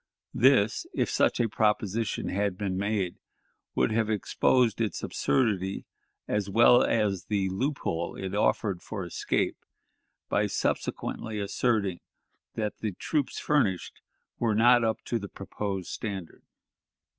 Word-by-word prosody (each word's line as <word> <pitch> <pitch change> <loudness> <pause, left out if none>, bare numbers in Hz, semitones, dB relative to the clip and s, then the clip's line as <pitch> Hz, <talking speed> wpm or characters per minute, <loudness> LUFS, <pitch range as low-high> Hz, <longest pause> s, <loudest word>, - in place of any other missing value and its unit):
This, 115 -4 +3
if - - 0
such - - +2
a 120 - +3
proposition 105 0 0
had 100 -1 -1
been 95 -2 -2
made, 100 -2 -1 0.6
would - - +2
have 110 0 +1
exposed 115 +3 +2
its 110 - -2
absurdity, 100 -7 0 0.4
as 105 -1 -1
well 120 +4 +6
as 105 -5 +1
the 100 -3 0
loophole 95 - -2
it 95 -1 -5
offered 100 -2 +1
for 100 -5 -5
escape, 85 - -1 0.7
by - - +1
subsequently 110 -2 -2
asserting 100 -2 0 0.6
that 105 -2 -3
the 110 -3 -2
troops 145 - -2
furnished 115 - 0 0.4
were 115 -3 +1
not 120 +2 +6
up 110 -1 -1
to 120 - -1
the 100 -1 -7
proposed 95 -1 -5
standard. 95 -6 -5
105 Hz, 125 wpm, -28 LUFS, 95-115 Hz, 0.7 s, well